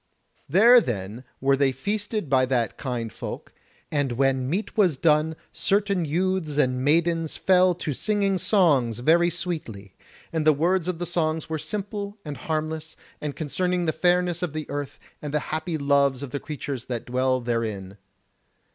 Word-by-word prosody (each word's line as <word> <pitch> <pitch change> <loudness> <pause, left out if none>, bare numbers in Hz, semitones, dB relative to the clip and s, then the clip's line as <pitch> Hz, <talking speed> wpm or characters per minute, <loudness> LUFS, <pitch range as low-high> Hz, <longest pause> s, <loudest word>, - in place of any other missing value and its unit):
There 235 - +7
then 110 - -4 0.2
were 135 +1 +3
they 135 -1 +2
feasted 205 - -3
by 130 -1 +3
that 120 -4 0
kind 120 -5 -4
folk, - - -7 0.4
and 145 -4 0
when 130 0 +1
meat 195 +8 -2
was 185 -10 +3
done 155 +1 +2 0.2
certain 200 -3 +1
youths 170 -1 -1
and 130 -3 +1
maidens 165 +2 +1
fell 185 -1 +4
to 160 -4 -3
singing 200 +3 0
songs 155 - +3
very 165 +7 +4
sweetly; 155 - -4 0.4
and 160 -1 0
the 155 0 +5
words 170 +4 +1
of 180 -2 -2
the 175 - -3
songs 160 -2 -1
were 160 -1 -2
simple 205 +2 -5
and 150 -1 -5
harmless, 155 +3 -3 0.3
and 150 -2 -4
concerning 180 +3 -1
the 160 - 0
fairness 175 +1 +1
of 175 -5 -2
the 155 -1 -4
earth 145 -1 -4 0.2
and 150 0 -4
the - - +3
happy 160 +1 -2
loves 140 -2 +2
of 135 - -7
the 140 - -3
creatures 140 -4 -5
that 120 -3 -4
dwell 130 +1 +1
therein. 110 -5 -3
155 Hz, 165 wpm, -25 LUFS, 130-180 Hz, 0.4 s, There